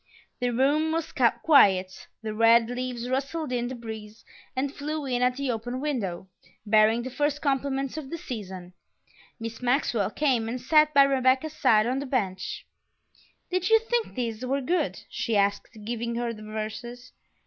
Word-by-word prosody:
The 245 Hz, -, 0 dB
room 285 Hz, +6 st, +2 dB
was 325 Hz, 0 st, -2 dB
quiet; 195 Hz, -, +3 dB, 0.2 s
the 215 Hz, -1 st, -3 dB
red 230 Hz, +1 st, +5 dB
leaves 245 Hz, -1 st, -4 dB
rustled 275 Hz, +3 st, -2 dB
in 245 Hz, -1 st, -1 dB
the 260 Hz, -, -5 dB
breeze 220 Hz, -2 st, -9 dB, 0.3 s
and 270 Hz, +2 st, -1 dB
flew 300 Hz, +1 st, -4 dB
in 250 Hz, -2 st, -1 dB
at 250 Hz, 0 st, +2 dB
the 275 Hz, -1 st, -1 dB
open 245 Hz, +2 st, -4 dB
window, 215 Hz, -12 st, -3 dB, 0.4 s
bearing 215 Hz, +2 st, +4 dB
the 260 Hz, -, -6 dB
first 290 Hz, +2 st, 0 dB
compliments 275 Hz, -1 st, -1 dB
of 290 Hz, -4 st, -6 dB
the 335 Hz, -, -4 dB
season. 190 Hz, -, -7 dB, 0.7 s
Miss 230 Hz, +1 st, -6 dB
Maxwell 245 Hz, -5 st, +1 dB
came 245 Hz, -4 st, 0 dB
and 250 Hz, +2 st, -3 dB
sat 305 Hz, +4 st, +4 dB
by 280 Hz, -, +9 dB
Rebecca's 270 Hz, +2 st, +2 dB
side 215 Hz, -8 st, +4 dB
on 255 Hz, +3 st, 0 dB
the 280 Hz, -, -5 dB
bench. 195 Hz, -8 st, -2 dB, 0.9 s
"Did 370 Hz, +2 st, 0 dB
you 445 Hz, -, +7 dB
think 455 Hz, +1 st, -2 dB
these 235 Hz, -2 st, -3 dB
were 270 Hz, +2 st, 0 dB
good?" 335 Hz, +7 st, -1 dB
she 225 Hz, -3 st, -1 dB
asked, 200 Hz, 0 st, +1 dB, 0.2 s
giving 235 Hz, +1 st, -3 dB
her 235 Hz, 0 st, -2 dB
the 215 Hz, -, -11 dB
verses. 220 Hz, +3 st, -6 dB
250 Hz, 165 wpm, -26 LUFS, 225-280 Hz, 0.9 s, by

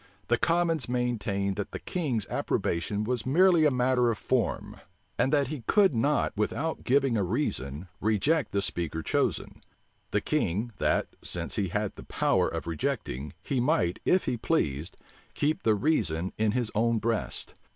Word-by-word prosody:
The 120 Hz, -, +4 dB
commons 165 Hz, -6 st, +1 dB
maintained, 105 Hz, -6 st, -1 dB
that 100 Hz, -, -3 dB
the -, -, -5 dB
king 155 Hz, -10 st, -2 dB
s 105 Hz, -, -2 dB
approbation 100 Hz, +5 st, -1 dB
was 120 Hz, +1 st, -1 dB
merely 170 Hz, +3 st, +5 dB
a -, -, +6 dB
matter 125 Hz, -1 st, +2 dB
of 115 Hz, -, -1 dB
form, 120 Hz, -7 st, -1 dB, 0.4 s
and 125 Hz, +3 st, +3 dB
that 140 Hz, -3 st, +2 dB
he 150 Hz, -4 st, -5 dB
could 200 Hz, -6 st, +5 dB
not 135 Hz, 0 st, +1 dB
without 145 Hz, +10 st, -2 dB
giving 135 Hz, -2 st, +2 dB
a 100 Hz, -, +1 dB
reason, 85 Hz, -, -2 dB
reject 110 Hz, +8 st, +1 dB
the 100 Hz, -1 st, 0 dB
speaker 80 Hz, -3 st, -3 dB
chosen; -, -, -1 dB, 0.5 s
the -, -, +1 dB
king, 105 Hz, +8 st, -1 dB
that, -, -, +1 dB
since 85 Hz, -1 st, -3 dB
he 100 Hz, -3 st, 0 dB
had 105 Hz, +3 st, -2 dB
the -, -, -9 dB
power -, -, +1 dB
of -, -, -4 dB
rejecting, 75 Hz, -3 st, -3 dB
he 135 Hz, -, -1 dB
might, 125 Hz, -, +1 dB
if 185 Hz, -, +3 dB
he 120 Hz, -, -1 dB
pleased, 80 Hz, -, -1 dB, 0.4 s
keep 150 Hz, +2 st, 0 dB
the 110 Hz, -1 st, +3 dB
reason 95 Hz, -, 0 dB
in 110 Hz, -1 st, +1 dB
his 120 Hz, -3 st, 0 dB
own 115 Hz, +2 st, +2 dB
breast. 115 Hz, 0 st, -2 dB
115 Hz, 165 wpm, -28 LUFS, 100-140 Hz, 0.5 s, a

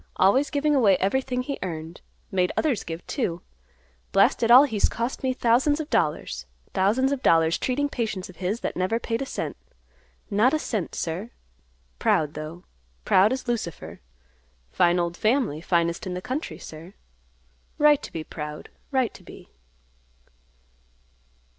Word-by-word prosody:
Always 260 Hz, +10 st, +3 dB
giving 295 Hz, 0 st, +1 dB
away 215 Hz, -9 st, +5 dB
everything 250 Hz, +5 st, 0 dB
he 280 Hz, +2 st, -4 dB
earned. 165 Hz, -2 st, -6 dB, 0.3 s
Made 180 Hz, -1 st, +1 dB
others 280 Hz, -9 st, +1 dB
give, 165 Hz, +1 st, -7 dB
too. 175 Hz, -, -2 dB, 0.7 s
Blast -, -, +4 dB
it 230 Hz, -, +2 dB
all, 250 Hz, +3 st, +10 dB
he's 220 Hz, -8 st, +1 dB
cost 235 Hz, +3 st, -3 dB
me 260 Hz, -, +1 dB
thousands 255 Hz, +5 st, +2 dB
of 310 Hz, -, -5 dB
dollars, 65 Hz, -, -1 dB, 0.3 s
thousands 225 Hz, +8 st, +2 dB
of 280 Hz, -2 st, -2 dB
dollars, 165 Hz, -6 st, +3 dB
treating 280 Hz, +3 st, 0 dB
patients 220 Hz, -9 st, -3 dB
of 185 Hz, -, -14 dB
his 195 Hz, +5 st, -2 dB
that -, -, -3 dB
never 185 Hz, +6 st, 0 dB
paid 230 Hz, 0 st, -2 dB
a 270 Hz, -, -3 dB
cent; -, -, -4 dB, 0.8 s
not 225 Hz, +8 st, +4 dB
a -, -, +3 dB
cent, 215 Hz, -, -3 dB
sir. 175 Hz, +7 st, -3 dB, 0.7 s
Proud, 150 Hz, -1 st, +2 dB
though; 155 Hz, +3 st, -7 dB, 0.4 s
proud 195 Hz, +4 st, +5 dB
as 260 Hz, 0 st, -3 dB
Lucifer. 220 Hz, -, -4 dB, 0.7 s
Fine 175 Hz, 0 st, +3 dB
old, 170 Hz, 0 st, -1 dB
family; 220 Hz, -, +1 dB
finest 170 Hz, 0 st, 0 dB
in 180 Hz, -, -3 dB
the -, -, -3 dB
country, 275 Hz, +6 st, -4 dB
sir. 165 Hz, +4 st, -11 dB, 0.8 s
Right 295 Hz, -1 st, +5 dB
to -, -, -8 dB
be 160 Hz, -, -5 dB
proud, 150 Hz, -1 st, -7 dB, 0.2 s
right 260 Hz, -4 st, +1 dB
to -, -, -14 dB
be." -, -, -14 dB
210 Hz, 155 wpm, -25 LUFS, 170-260 Hz, 0.8 s, all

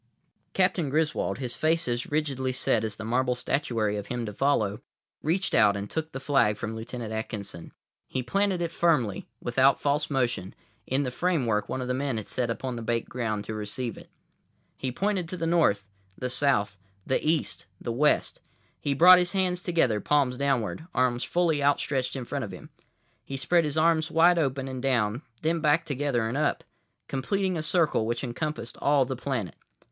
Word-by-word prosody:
Captain 185 Hz, -5 st, +2 dB
Griswold, 155 Hz, +2 st, 0 dB
his 125 Hz, -3 st, -4 dB
face 160 Hz, -1 st, +1 dB
as 120 Hz, 0 st, -2 dB
rigidly 140 Hz, -4 st, -1 dB
set 120 Hz, -3 st, +1 dB
as 110 Hz, -2 st, -3 dB
the 110 Hz, -, -7 dB
marble 125 Hz, +2 st, +1 dB
statuary 115 Hz, -6 st, -1 dB
of 100 Hz, -, -5 dB
him 120 Hz, -1 st, -3 dB
to 105 Hz, -, -5 dB
follow, 110 Hz, -4 st, +1 dB, 0.4 s
reached 180 Hz, +5 st, 0 dB
out 100 Hz, 0 st, +5 dB
and 100 Hz, +1 st, -6 dB
took 160 Hz, 0 st, -3 dB
the 135 Hz, -, -5 dB
flag 135 Hz, -7 st, +2 dB
from 110 Hz, 0 st, -4 dB
Lieutenant 115 Hz, 0 st, -6 dB
Atkinson. 105 Hz, -6 st, -5 dB, 0.4 s
He 130 Hz, -, -3 dB
planted 195 Hz, +3 st, +1 dB
it 165 Hz, -, -2 dB
firmly, 150 Hz, -, +1 dB, 0.2 s
without 130 Hz, +3 st, +3 dB
false 145 Hz, +1 st, 0 dB
motion, 120 Hz, -9 st, -1 dB, 0.3 s
in 135 Hz, +2 st, +1 dB
the 125 Hz, -, -2 dB
framework 125 Hz, -10 st, 0 dB
one 130 Hz, -, -2 dB
of -, -, -5 dB
the 125 Hz, -, 0 dB
men 135 Hz, -2 st, -1 dB
had 110 Hz, -, -5 dB
set 125 Hz, -2 st, -1 dB
upon 125 Hz, +1 st, -3 dB
the -, -, -5 dB
baked 115 Hz, 0 st, -1 dB
ground 110 Hz, -4 st, -2 dB
to 110 Hz, -, -5 dB
receive 110 Hz, +3 st, -4 dB
it. -, -, -13 dB, 0.7 s
He 130 Hz, -, -3 dB
pointed 190 Hz, +3 st, -1 dB
to 185 Hz, -, -5 dB
the 165 Hz, -, -2 dB
north, 165 Hz, -12 st, +3 dB, 0.3 s
the 125 Hz, 0 st, -3 dB
south, 105 Hz, -8 st, +1 dB, 0.3 s
the 130 Hz, -, 0 dB
east, 155 Hz, 0 st, 0 dB
the 120 Hz, -, -4 dB
west. 150 Hz, +5 st, +1 dB, 0.4 s
He 140 Hz, -1 st, -1 dB
brought 180 Hz, +5 st, +9 dB
his 180 Hz, +1 st, 0 dB
hands 180 Hz, -2 st, 0 dB
together, 145 Hz, -, +1 dB
palms 140 Hz, -4 st, +2 dB
downward, 140 Hz, +3 st, -1 dB
arms 125 Hz, -1 st, +2 dB
fully 170 Hz, -4 st, +1 dB
out 140 Hz, 0 st, +3 dB
stretched 130 Hz, -2 st, -1 dB
in 130 Hz, -2 st, -4 dB
front 140 Hz, +2 st, -3 dB
of 105 Hz, -, -5 dB
him. -, -, -11 dB, 0.5 s
He 135 Hz, -, -5 dB
spread 165 Hz, +6 st, +2 dB
his 150 Hz, +1 st, -2 dB
arms 160 Hz, 0 st, +3 dB
wide 170 Hz, +2 st, +5 dB
open 135 Hz, -3 st, -1 dB
and 130 Hz, -1 st, -5 dB
down, 120 Hz, -3 st, +1 dB, 0.2 s
then 165 Hz, +2 st, +1 dB
back 150 Hz, +1 st, +3 dB
together 135 Hz, -5 st, 0 dB
and 115 Hz, -, -3 dB
up; 155 Hz, -, 0 dB, 0.4 s
completing 185 Hz, +8 st, -1 dB
a 160 Hz, -, -1 dB
circle 155 Hz, -8 st, +1 dB
which 120 Hz, +2 st, -2 dB
encompassed 130 Hz, -1 st, -4 dB
all 140 Hz, -2 st, +4 dB
the 130 Hz, +1 st, -3 dB
planet. 125 Hz, -6 st, -3 dB
130 Hz, 190 wpm, -27 LUFS, 120-155 Hz, 0.7 s, brought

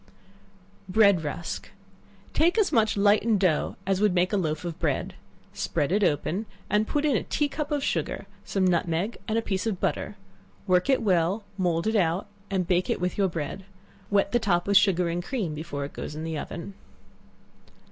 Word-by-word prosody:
Bread 200 Hz, -4 st, +5 dB
Rusk. 160 Hz, +3 st, -5 dB, 0.6 s
Take 340 Hz, +6 st, +3 dB
as 425 Hz, -3 st, +3 dB
much 220 Hz, -2 st, +2 dB
lightened 205 Hz, +1 st, +4 dB
dough, 180 Hz, -6 st, +1 dB
as 195 Hz, 0 st, +1 dB
would 210 Hz, -3 st, +3 dB
make 180 Hz, +3 st, +2 dB
a -, -, +4 dB
loaf 160 Hz, -3 st, -1 dB
of 170 Hz, -1 st, -5 dB
bread, 150 Hz, -5 st, -1 dB, 0.4 s
spread 145 Hz, -, -1 dB
it 205 Hz, +2 st, +2 dB
open, 180 Hz, +6 st, 0 dB, 0.2 s
and 210 Hz, +1 st, +2 dB
put 295 Hz, 0 st, 0 dB
in 290 Hz, -4 st, +3 dB
a -, -, +2 dB
tea 295 Hz, -, 0 dB
cup 295 Hz, +1 st, -4 dB
of 290 Hz, -2 st, -1 dB
sugar, 165 Hz, -, -2 dB, 0.2 s
some 195 Hz, -2 st, 0 dB
nutmeg 175 Hz, +3 st, 0 dB
and 220 Hz, -, 0 dB
a 230 Hz, -, 0 dB
piece 190 Hz, +1 st, -2 dB
of 200 Hz, -5 st, -2 dB
butter; -, -, -2 dB, 0.5 s
work 185 Hz, +4 st, +2 dB
it 265 Hz, -, +3 dB
well, 185 Hz, +1 st, +2 dB
mould 175 Hz, -3 st, 0 dB
it 220 Hz, +1 st, +1 dB
out, 180 Hz, -1 st, +2 dB, 0.2 s
and 190 Hz, -2 st, 0 dB
bake 180 Hz, 0 st, +1 dB
it -, -, 0 dB
with 180 Hz, 0 st, -1 dB
your 195 Hz, -2 st, +2 dB
bread; 165 Hz, +3 st, -4 dB, 0.5 s
wet 200 Hz, -1 st, +2 dB
the 240 Hz, -, +3 dB
top 175 Hz, -6 st, +1 dB
with 200 Hz, -, +1 dB
sugar 190 Hz, -3 st, +4 dB
and 170 Hz, +1 st, -2 dB
cream 205 Hz, -, -2 dB
before 150 Hz, -2 st, -4 dB
it 140 Hz, -, -9 dB
goes 150 Hz, -, -6 dB
in 155 Hz, -, -5 dB
the 160 Hz, 0 st, -3 dB
oven. 170 Hz, +5 st, -6 dB
190 Hz, 190 wpm, -26 LUFS, 170-210 Hz, 0.6 s, Bread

